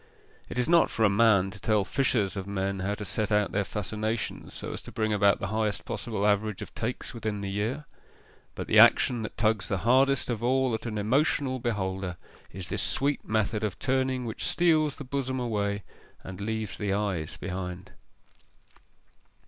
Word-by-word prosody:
It - - -6
is 125 - +1
not 170 0 +5
for 115 - -1
a 100 - +4
man 100 -2 +4
to 100 - -11
tell 105 -2 +1
fishers 110 -7 +1
of 95 -1 -5
men 100 0 -2
how 100 +2 -1
to 105 -1 -6
set 110 +2 -2
out 105 -1 +2
their 100 - +1
fascinations 110 +2 -3
so - - -5
as - - -6
to - - -11
bring 110 -1 0
about 100 -1 +4
the 100 - -3
highest 110 -1 -1
possible 110 -3 -2
average 105 -1 +1
of - - -12
takes 115 +2 -4
within 110 -3 -3
the 100 -1 -3
year: 115 +9 -2 0.7
but - - -4
the - - +5
action 120 -2 +6
that 105 - -6
tugs 110 -2 +1
the 100 - 0
hardest 135 +2 +4
of 115 -2 -3
all 130 +1 +2
at 110 +2 -3
an 110 -2 -3
emotional 130 +4 +1
beholder 95 -6 -2 0.3
is 90 -1 -7
this - - -1
sweet 135 +11 0
method 110 0 0
of 105 -4 -2
turning 130 -1 0
which 110 - -3
steals 155 -4 +3
the - - -8
bosom 130 -1 -2
away 100 -4 -1 0.4
and 95 +1 -8
leaves 110 0 -3
the 105 -2 -1
eyes 95 -6 -1
behind. 90 -1 -5
110 Hz, 185 wpm, -28 LUFS, 100-125 Hz, 0.7 s, action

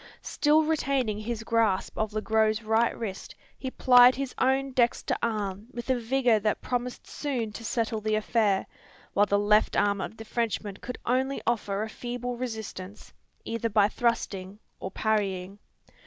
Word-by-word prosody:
Still 305 +1 +3
retaining 275 -8 0
his 225 +1 -4
grasp 225 -4 +1
of 220 -1 -1
Le 215 0 -2
Gros's 220 0 +2
right 225 +2 +2
wrist, 200 -5 -6 0.2
he 260 - -3
plied 250 -1 +6
his 275 -1 -4
own 265 +1 +2
dexter 240 -2 +1
arm 210 -2 -2
with 240 +2 -3
a - - +3
vigour 240 -1 +2
that 210 0 0
promised 245 0 -3
soon 250 -7 -3
to 230 - -8
settle 225 -1 -1
the 215 0 0
affair; 215 -2 +1 0.5
while 205 +1 +4
the 200 - +2
left 210 +1 +3
arm 200 -1 +2
of 220 - -6
the 225 - -9
Frenchman 215 -3 -2
could 250 +3 -7
offer 245 - +2
only 265 +2 0
a 235 - +3 0.3
feeble 245 +2 -5
resistance, 220 -5 -7 0.3
either 230 0 -2
by 205 -1 +4
thrusting 205 -4 -2 0.2
or 190 - -4
parrying. 195 -2 -1
225 Hz, 160 wpm, -27 LUFS, 210-245 Hz, 0.5 s, plied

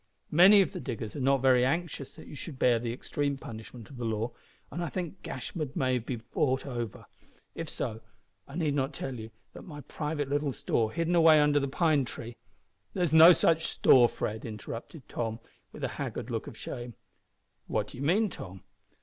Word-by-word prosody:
Many 195 +5 +8
of 190 - -6
the 180 - -4
diggers 115 -7 -5
are - - -4
not 135 0 +2
very 130 -2 +5
anxious 145 0 -2
that - - -12
you - - -10
should 145 0 -8
bear 120 -2 +3
the 115 0 -3
extreme 140 +3 -2
punishment 115 -1 -9
of 135 - -12
the 120 - -5
law, 115 +1 -1 0.4
and 175 - -3
I 170 - -2
think 175 -2 -5
Gashford 145 +2 -5
may 130 -1 +1
be 120 +2 -4
bought 130 +3 -1
over. 120 -5 -5 0.5
If - - -5
so, 110 0 -3 0.5
I 140 - -10
need 160 -4 0
not 135 +1 -1
tell 135 - -4
you 110 -2 -7 0.2
that - - -10
my 160 - -10
little 145 - -8
private 145 -2 -2
store 110 -2 0
hidden 165 +3 -1
away 160 -2 +7
under 150 0 +4
the 140 - -1
pine 150 0 +2
tree 120 -1 -7 0.3
" - - -41
"There 185 - +1
is 165 - 0
no 160 +2 +10
such 165 -2 +3
store, 120 -2 +5
Fred," 110 +1 -4
interrupted 115 +6 -8
Tom, 115 -1 -3 0.3
with - - -10
a - - +2
haggard - - -4
look - - -3
of - - -9
shame. 120 -2 -6 0.7
"What - - -1
do - - -11
you 135 - -4
mean, 195 +7 +2
Tom?" 95 -1 -9
135 Hz, 200 wpm, -29 LUFS, 120-160 Hz, 0.7 s, no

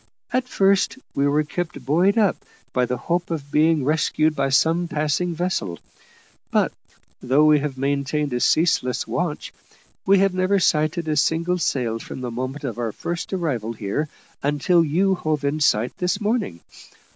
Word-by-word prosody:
At 255 0 +1
first, 195 0 +2 0.2
we 140 +1 +1
were 150 +2 +2
kept 160 -3 -5
buoyed 175 - +3
up 210 -4 +3 0.4
by 125 -1 +1
the 125 - -2
hope 175 +4 -2
of 145 -4 -5
being 155 -2 +3
rescued 155 +1 +1
by 140 -1 0
some 165 +5 +2
passing 155 +3 -1
vessel; 155 - -2 0.7
but, - - +2 0.5
though 135 +4 +3
we 150 -1 +5
have 140 -2 -4
maintained 140 +1 -1
a 120 - 0
ceaseless 130 -4 +2
watch, - - -3 0.5
we 195 +1 +4
have 195 0 +3
never 185 +2 +2
sighted 160 -1 +1
a 155 - 0
single 165 +4 +1
sail 120 -7 -1
from 130 - -8
the 125 -1 -4
moment 130 +5 -5
of 120 -4 -4
our 115 -2 -1
first 170 +8 -5
arrival 135 - -2
here 115 +8 -3 0.3
until 150 +5 +2
you 180 +6 +2
hove 155 -5 -2
in 145 +2 0
sight 120 -5 +2
this 180 0 0
morning. 210 - -1
155 Hz, 165 wpm, -22 LUFS, 135-175 Hz, 0.7 s, we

